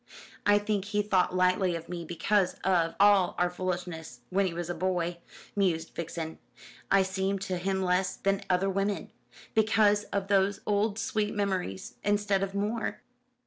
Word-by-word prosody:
"I 205 0 +6
think 205 -1 -1
he 210 0 0
thought 185 -3 +2
lightly 185 0 +2
of 165 0 -6
me 170 -1 -5
because 180 +3 +1
of 170 -3 +2
all 200 -3 +5
our 175 0 +1
foolishness 175 -7 -4
when 195 +1 +2
he - - -2
was 175 -1 -3
a 175 - -2
boy," 175 0 -1 0.4
mused 175 -5 +1
Vixen. 165 -1 -5 0.5
"I 195 -1 +5
seemed 190 +1 -1
to 185 -2 -2
him 190 +1 -1
less 185 0 +1
than 195 0 0
other 185 +1 +2
women 195 +1 -1 0.4
because 215 -1 +3
of 195 -1 -3
those 200 0 +2
old 205 0 +1
sweet 215 -2 -1
memories 190 - -2
instead 205 -1 +1
of 195 0 -3
more." 215 +3 -2
190 Hz, 160 wpm, -29 LUFS, 180-205 Hz, 0.5 s, I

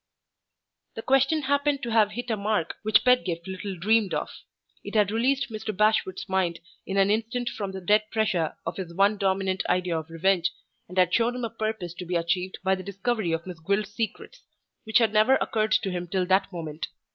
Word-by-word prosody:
The 225 - -6
question 270 +4 +3
happened 285 +1 +1
to 235 - -3
have 215 -2 +3
hit 240 +1 -4
a - - +2
mark 205 -4 -1
which 215 0 +4
Pedgift 190 -10 +2
little 190 0 -5
dreamed 215 +2 +2
of. - - -3 0.5
It - - -7
had 205 -2 +3
released 260 +3 +1
Mr. 215 -2 -5
Bashwood's 210 -3 +1
mind 185 -3 0 0.3
in 195 - -2
an 195 +1 +4
instant 230 +3 -1
from 200 -3 -5
the 190 0 -7
dead 210 +3 +2
pressure 215 -8 0
of - - -4
his 175 -3 -6
one 200 +3 +3
dominant 190 -1 0
idea 180 -1 +1
of 160 +1 -10
revenge, 175 +1 +1 0.4
and 180 - -9
had 180 -1 +4
shown 235 +1 +2
him 250 -1 -3
a 225 - -5
purpose 215 -6 -3
to 180 - -7
be 180 - -2
achieved 175 +2 -1
by 190 0 +3
the 190 - -2
discovery 200 0 -2
of 165 +1 -2
Miss 180 -3 -8
Gwilt's 200 +5 -1
secrets 230 - -5 0.4
which 220 - +3
had 225 -3 +3
never 215 +5 +5
occurred 215 -4 0
to 195 - +1
him 175 0 -4
till 185 +1 0
that 190 +2 +2
moment. 160 -3 -5
200 Hz, 205 wpm, -26 LUFS, 185-225 Hz, 0.5 s, never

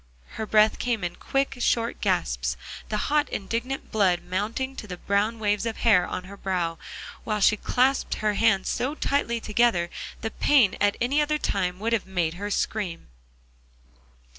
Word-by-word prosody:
Her 220 - -5
breath 215 0 +4
came 235 -5 -1
in 175 - -3
quick, 275 -1 -1
short 230 -1 0
gasps, - - 0 0.3
the 215 - -1
hot 300 0 +3
indignant 235 +6 -3
blood 185 -5 +2
mounting 215 +9 -2
to 215 - -7
the 180 -2 -6
brown 205 +5 0
waves 210 0 0
of 225 - -3
hair 205 -6 +4
on 180 - -4
her 195 +2 -10
brow, 175 -4 -2 0.4
while 215 -1 -1
she 210 +1 +5
clasped 255 +5 +1
her 210 -1 0
hands 200 -3 +2
so 260 +5 -1
tightly 275 -6 0
together, 215 -6 +1 0.3
the 225 - -3
pain 255 -10 +4
at 205 0 +3
any 275 +5 +2
other 300 0 +1
time 180 -9 -1
would 225 +4 -1
have 220 -5 0
made 175 -4 0
her 200 +4 -5
scream. 200 - -2
210 Hz, 165 wpm, -26 LUFS, 190-235 Hz, 0.4 s, she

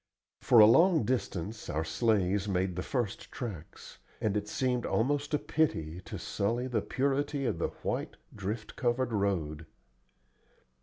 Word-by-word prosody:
For 120 - +4
a 110 - +11
long 165 - +5
distance 105 -4 -3
our 80 +1 -1
sleighs 100 +2 +1
made 95 -2 0
the 90 - -2
first 120 -4 -3
tracks, 100 -11 -8 0.2
and 105 -2 0
it 105 0 -1
seemed 125 +1 0
almost 145 +5 0
a - - +3
pity 90 - -1
to - - -6
sully 115 +5 -1
the 120 -4 0
purity 140 +2 -1
of 85 - -1
the - - +1 0.2
white, - - -2 0.2
drift 105 +2 -5
covered 120 -1 0
road. 85 -7 -1
110 Hz, 145 wpm, -30 LUFS, 95-130 Hz, 0.2 s, a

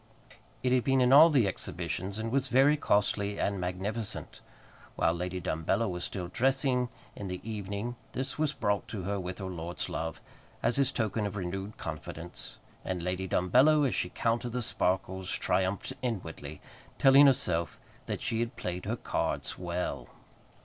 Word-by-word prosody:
It 125 - +2
had 125 -1 +3
been 135 -1 +3
in 125 +1 +5
all 155 +4 +10
the 135 -8 +4
exhibitions, 90 +2 -3
and 110 +1 -3
was 135 0 +1
very 135 +4 +5
costly 100 -6 +1
and 100 -2 0
magnificent. 100 +5 -4 0.5
While 80 - +2
Lady 90 +1 -3
Dumbello 90 +7 0
was 90 -1 -3
still 90 -3 -3
dressing 130 +3 +1 0.3
in 100 - -6
the 90 -1 -4
evening 105 +2 -4 0.2
this 135 +3 -3
was 155 -2 +2
brought 105 -7 -1
to 100 -5 -5
her 100 +2 -1
with 90 0 -5
her 95 - -5
lord's 90 -1 -4
love, 80 -1 -3 0.4
as 120 - +2
his 140 -2 +3
token 110 -2 0
of 100 - -6
renewed 95 +2 -4
confidence; 80 +3 -6 0.3
and 90 -2 -3
Lady 90 +1 -2
Dumbello, 130 - +4
as - - -1
she 90 - -1
counted 115 +4 -1
the 125 -1 -1
sparkles, 95 -2 -1
triumphed 95 +6 0
inwardly, 85 - -4 0.4
telling 140 +1 +8
herself 85 -10 +1 0.3
that - - -3
she 115 - -1
had 120 +2 -2
played 90 0 -4
her - - -1
cards - - -2
well. 90 0 -3
100 Hz, 165 wpm, -30 LUFS, 90-125 Hz, 0.5 s, all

